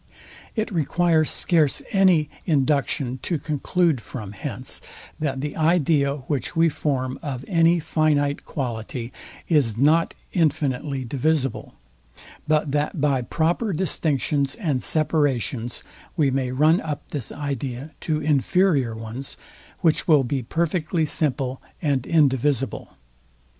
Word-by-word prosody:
It 220 -1 -1
requires 165 -1 +2
scarce 160 -6 +2
any, 185 -6 +4 0.2
induction 140 -3 +1
to 170 - -1
conclude 155 -1 0
from 110 -4 -7
hence, 100 - -5 0.4
that 135 -3 -2
the 150 0 -4
idea, 155 -3 +2
which 140 +4 -2
we 165 0 +4
form 135 -3 -2
of 135 -4 -5
any 170 -1 +4
finite 150 -3 +1
quality, 120 -1 -5 0.3
is 135 -10 +2
not 155 +6 +3 0.2
infinitely 145 -4 0
divisible, 140 +1 -1 0.7
but 150 -2 +2
that 150 +3 -1
by 140 -3 +2
proper 170 - 0
distinctions 145 -5 0
and 150 - -1
separations 135 -6 0 0.3
we 145 -4 +3
may 130 -1 0
run 155 +6 +4
up 150 -2 -5
this 140 -7 -3
idea 140 0 -4
to 155 -2 -1
inferior 150 -3 +2
ones, 115 +4 -6 0.4
which 165 -4 +2
will 150 -5 +5
be 130 +2 -1
perfectly 165 +4 0
simple 135 -4 -1 0.2
and 140 -6 0
indivisible. 135 - +1
145 Hz, 115 wpm, -23 LUFS, 130-160 Hz, 0.7 s, will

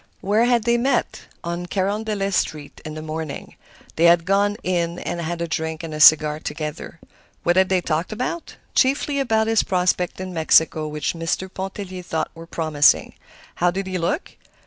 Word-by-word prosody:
Where 210 +4 +2
had 240 -2 +2
they 235 +1 +2
met? 250 0 -1 0.2
On 170 +1 -4
Carondelet 200 +1 -1
Street, 150 -5 -2
in 155 0 -7
the 155 - -6
morning. 155 -2 -6 0.4
They 165 - +4
had 170 -1 +5
gone 200 +2 +2
"in" 170 -1 -1
and 175 -1 -4
had 170 +1 -3
a - - -3
drink 160 0 -3
and 160 -1 -6
a 155 - -5
cigar 155 0 +6
together. 155 +1 -6 0.4
What 175 - +2
had 190 0 +4
they 185 -1 +2
talked 165 +3 -2
about? 255 +10 -4 0.2
Chiefly 280 +1 +2
about 220 -5 +2
his 225 0 +3
prospects 180 -1 0
in 185 -1 -5
Mexico, 160 -1 +3
which 150 0 -2
Mr. 170 +3 -3
Pontellier 190 -1 -6
thought 160 -3 -3
were 165 0 -11
promising. 155 -4 +2 0.4
How 175 - +3
did 190 +2 -3
he 185 -1 -3
look? 175 - -2
175 Hz, 175 wpm, -22 LUFS, 160-200 Hz, 0.4 s, cigar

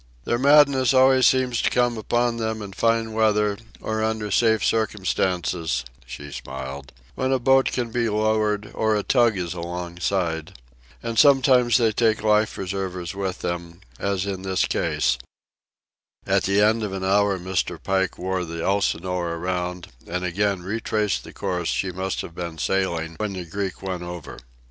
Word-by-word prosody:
"Their 120 - 0
madness 140 -2 +5
always 130 0 +6
seems 130 -2 +2
to - - +2
come 120 -1 +1
upon 120 +2 0
them 110 -1 -2
in 100 -1 -8
fine 115 +1 +1
weather 105 -2 +2 0.2
or 110 0 -2
under 110 -1 -2
safe 110 +1 +3
circumstances," 95 - 0 0.2
she 70 +4 -8
smiled, 65 0 -7 0.2
"when 130 0 -1
a 135 - +3
boat 135 +1 +4
can 120 -2 -2
be 115 -1 0
lowered 105 -1 0
or 110 -1 +1
a 105 - 0
tug 120 -5 +3
is 90 -1 -3
alongside. 85 -2 -3 0.5
And 115 -1 -1
sometimes 130 -3 +5
they 115 -3 +3
take 110 0 +1
life—preservers 95 -4 0
with 95 -1 -4
them, 85 0 -5 0.2
as 100 -1 -1
in 95 -2 -4
this 95 -1 0
case." - - 0 1.1
At - - +2
the 100 +1 +3
end 110 +2 +3
of 105 -3 -3
an 95 -1 -4
hour 100 +1 +2
Mr. 95 0 -2
Pike 95 -1 0
wore 95 0 -2
the 85 -1 -5
Elsinore 90 -3 0
around, 90 0 -3 0.2
and 90 +2 -3
again 95 +1 0
retraced 105 +1 -1
the - - -11
course 90 -4 -3
she 95 - -1
must 95 +1 -3
have 85 - -9
been 85 -1 -6
sailing 85 -2 -1
when 105 -2 -2
the 90 -2 -5
Greek 95 +3 -4
went 95 -2 -3
over. 85 -3 -8
100 Hz, 160 wpm, -23 LUFS, 90-110 Hz, 1.1 s, always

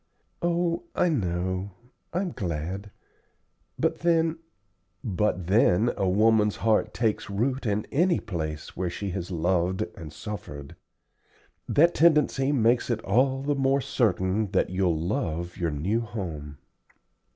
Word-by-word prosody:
"Oh, 175 0 0
I 180 - +3
know. 95 - -1 0.4
I'm 180 +1 -1
glad; 95 - -4 0.9
but - - 0
then 165 -1 +2 0.4
" 90 - -47 0.2
"But 95 -3 0
then 105 +3 +4
a 95 - 0
woman's 105 +1 +3
heart 110 0 +1
takes 110 -2 -1
root 125 +6 -1
in 105 0 0
any 170 +4 +3
place 80 -7 -5
where 90 0 -1
she 100 +3 -4
has 90 -1 -4
loved 90 +1 0
and 80 -4 -9
suffered. 70 -7 -7 0.9
That 170 +4 +5
tendency 150 -4 +3
makes 120 -3 +2
it 115 -2 -1
all 130 +6 +2
the 145 +1 +1
more 135 0 +2
certain 105 -5 0
that 95 - +2
you'll 90 -4 +1
love 85 0 -2
your 85 -2 0
new 85 +10 0
home." 80 -10 -6
105 Hz, 130 wpm, -26 LUFS, 90-135 Hz, 0.9 s, That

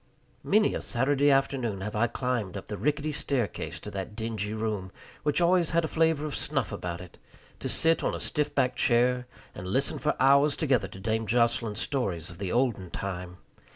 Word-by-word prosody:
Many 210 +1 +3
a - - -2
Saturday 140 +3 +2
afternoon 135 -7 +1
have 105 +2 -4
I 115 +3 +3
climbed 115 -5 -2
up 95 - -7
the 105 - -5
rickety 150 +5 0
staircase 140 -6 -1
to - - -7
that 100 +2 -5
dingy 110 -2 -3
room, 105 -4 -3 0.3
which 150 +2 +1
always 175 -1 +3
had 170 0 +2
a - - -1
flavor 160 -2 +2
of 150 - -3
snuff - - -1
about 85 -1 -4
it, 90 - -13 0.4
to - - -3
sit 165 0 +3
on - - 0
a - - -5
stiff 150 -1 -1
backed 125 -1 +2
chair 125 +1 +3 0.3
and 90 - -7
listen 135 +9 0
for - - 0
hours 140 +2 +5
together 135 -6 +1
to 95 - -11
Dame 110 +2 -1
Jocelyn's 115 -2 +2
stories 95 - -2
of 85 - -13
the 95 -2 -3
olden 115 -7 +1
time. 90 -2 -5
120 Hz, 190 wpm, -28 LUFS, 100-145 Hz, 0.4 s, hours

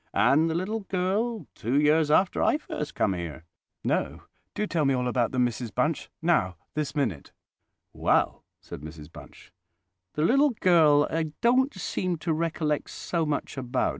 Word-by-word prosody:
and 155 +4 +4
the 160 - -1
little 195 +6 -2
girl, 200 +4 -1
two 125 +6 0
years 150 +1 +3
after 180 +5 +3
I - - +3
first 150 - -6
come 100 - +1
here?" 85 -3 -6 0.4
"No. - - -1 0.3
Do 210 - 0
tell 165 -6 0
me 135 -1 +2
all 125 0 -1
about 125 -1 +1
them, 125 -1 +2
Mrs 120 -1 -4
Bunch—now, 155 - 0 0.2
this 150 0 -3
minute!" 115 - -2 0.6
"Well," - - +1 0.2
said - - -10
Mrs 75 0 -10
Bunch, - - -14 0.6
"the 150 - 0
little 275 - +3
girl 155 -5 +5
I 160 -2 -2
don't 255 +3 +3
seem 185 -1 -2
to 160 +1 -1
recollect 155 -2 -1
so 165 -3 -2
much 145 -1 -3
about. 125 0 0
155 Hz, 160 wpm, -27 LUFS, 125-180 Hz, 0.6 s, girl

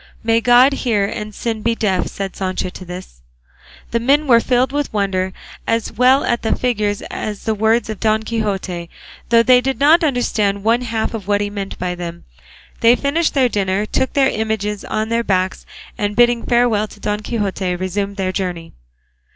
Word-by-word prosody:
"May 225 0 +2
God 245 +4 +6
hear 225 -7 0
and 210 +1 -5
sin 225 -2 -3
be 230 +1 +1
deaf," 195 -5 0
said 195 -1 -5
Sancho 185 -1 -2
to 185 - -10
this. 180 - -9 0.7
The 235 - +1
men 280 +6 +2
were 240 -4 +6
filled 250 +2 +1
with 290 0 -2
wonder, 190 -3 -1 0.4
as 230 -1 0
well 255 +3 +4
at 235 - 0
the 220 - 0
figure 215 -5 0
as 205 - -4
at 210 -2 -5
the 220 - +1
words 220 +3 +1
of 220 -2 -5
Don 220 0 +1
Quixote, 195 -6 -3 0.4
though 230 0 +5
they 250 0 +5
did 265 +1 -2
not 310 +5 +5
understand 215 -8 0
one 230 +3 +2
half 230 -2 -2
of 210 -4 -6
what 205 0 +2
he 205 0 -2
meant 200 -1 -5
by 180 0 -2
them. 170 -1 -7 0.6
They 235 +1 +5
finished 300 +5 0
their 265 -2 +4
dinner, 200 -2 0
took 260 - -1
their 270 -2 +3
images 215 -2 -2
on 215 +1 -2
their 230 0 +1
backs, 185 -3 -1 0.3
and 205 0 -1
bidding 240 0 +3
farewell 235 -3 +2
to 210 - -15
Don 210 0 -2
Quixote 200 -4 -2
resumed 195 +2 -3
their 185 -1 -1
journey. 180 -3 -4
215 Hz, 190 wpm, -18 LUFS, 195-240 Hz, 0.7 s, God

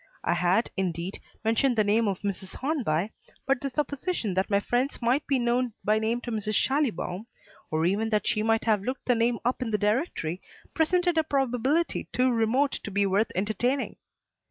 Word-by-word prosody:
I - - +2
had, 180 +6 +2
indeed, 180 0 -2 0.2
mentioned 235 +4 +2
the 215 - +3
name 215 +2 +2
of 195 -2 -2
Mrs. 195 -2 -4
Hornby, 225 - -1 0.3
but 275 -2 +1
the 275 - -2
supposition 285 - -2
that 190 +1 0
my 200 -1 +3
friends 245 +6 -1
might 250 +5 +1
be 275 - +2
known 240 0 +1
by 215 +1 +3
name 225 +2 0
to 240 - -5
Mrs. 215 -1 -2
Schallibaum, 230 - 0 0.4
or 160 +1 0
even 205 +5 +1
that 210 -2 +1
she 215 - +1
might 225 +1 +2
have 215 -3 +3
looked 255 +6 -4
the 250 - +4
name 235 0 +2
up 250 +2 0
in 245 - -1
the 210 - +1
directory, 210 - -1 0.3
presented 350 +1 +2
a - - +3
probability 270 +3 0
too 255 0 +2
remote 245 +5 +2
to - - -5
be 200 0 +1
worth 200 +3 +1
entertaining. 220 +8 -1
225 Hz, 185 wpm, -27 LUFS, 205-260 Hz, 0.4 s, the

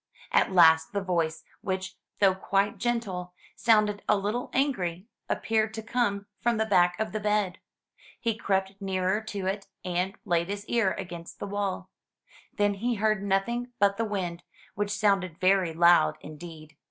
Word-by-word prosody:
At - - +3
last 160 -2 +6
the 200 - 0
voice, 165 -3 -1 0.2
which, 190 -1 -3 0.2
though 195 -2 +5
quite 195 +2 0
gentle, 190 -7 -2 0.2
sounded 210 -3 +3
a 210 - +5
little 210 +5 -2
angry, 190 -10 0 0.2
appeared 220 0 0
to 220 - -5
come 225 -4 0
from 240 -1 +1
the 220 - +1
back 180 -4 +3
of 220 0 -1
the 215 - -2
bed. 210 -3 0 0.6
He 230 -1 0
crept 195 -1 -1
nearer 190 +1 0
to 205 -3 -5
it, 195 +1 -2 0.2
and 180 +2 -1
laid 170 -2 +1
his 205 +1 -4
ear 225 -5 +1
against 175 -3 -8
the - - -5
wall. 200 -1 -3 0.6
Then 205 -1 +1
he 235 +5 -1
heard 215 -1 +1
nothing 235 +5 -1
but 200 0 +3
the 230 - 0
wind, 180 -5 -3 0.3
which 205 0 -2
sounded 195 -4 +1
very 185 -2 +3
loud 165 - +5
indeed. 155 0 -10
195 Hz, 160 wpm, -28 LUFS, 180-215 Hz, 0.6 s, last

